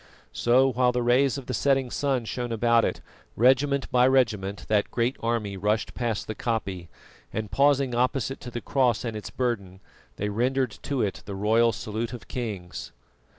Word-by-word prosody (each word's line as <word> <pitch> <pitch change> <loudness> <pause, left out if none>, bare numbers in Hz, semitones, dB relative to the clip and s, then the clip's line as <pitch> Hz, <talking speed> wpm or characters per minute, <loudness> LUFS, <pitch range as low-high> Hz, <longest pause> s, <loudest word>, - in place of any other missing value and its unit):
So, 130 +3 +3
while 125 0 +2
the 125 0 -1
rays 130 +3 +3
of 135 - -7
the 125 - -4
setting 135 +2 +1
sun 135 -4 0
shone 120 +1 -4
about 115 0 +3
it, - - -1 0.3
regiment 135 +3 +3
by 125 0 +5
regiment 105 -7 +1
that 105 -1 +2
great 120 +3 0
army 115 -4 -2
rushed 105 +3 0
past 115 -4 -2
the 110 - -4
koppie, 100 -7 -3 0.4
and 110 -1 -4
pausing 140 -2 +3
opposite 130 +2 0
to 125 - -8
the 120 0 -5
cross 125 -3 +1
and 115 -2 -3
its 105 - -6
burden, 100 -7 -3 0.4
they 105 +8 -2
rendered 125 +3 0
to 140 -4 -1
it 100 - -3
the 100 - -5
royal 110 +4 +3
salute 110 +2 -4
of 120 - -9
kings. 95 - -5
120 Hz, 175 wpm, -26 LUFS, 105-130 Hz, 0.4 s, by